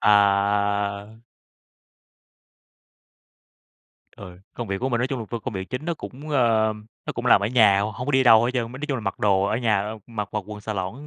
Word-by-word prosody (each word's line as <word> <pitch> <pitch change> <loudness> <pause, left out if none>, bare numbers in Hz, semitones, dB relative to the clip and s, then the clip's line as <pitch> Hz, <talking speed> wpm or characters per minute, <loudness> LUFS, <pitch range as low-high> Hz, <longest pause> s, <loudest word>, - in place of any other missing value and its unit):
À. 100 0 +2 3.0
Ừ. 90 -3 -11 0.2
Công 120 - -5
việc 95 0 -2
của 130 - -1
mình 120 -3 0
nói 125 - +1
chung 135 0 -4
là 115 - -5
vô 120 - -3
công 115 0 -6
việc 95 0 -5
chính 130 +4 -4
nó 170 0 -1
cũng, 145 -1 -10
ơ, 115 -5 +2 0.3
nó - - -3
cũng - - -5
làm - - +6
ở 100 - 0
nhà, 105 -4 +4
h - - 0
hông 125 +2 -6
có 145 - -1
đi 130 0 +4
đâu 115 -2 +6
hết 120 - +1
trơn, 120 -2 -2
mới 130 - -8
nói 150 - -4
chung 135 - 0
là - - -5
mặc 100 -2 -4
đồ 95 -2 +2
ở 105 +2 0
nhà, 115 -3 +1
a, 105 +2 -4
mặc 105 -3 -5
mặc 105 - -1
quần 105 -1 -8
xà 110 +1 -4
lỏn, 100 +9 -5
110 Hz, 230 wpm, -24 LUFS, 100-125 Hz, 3.0 s, làm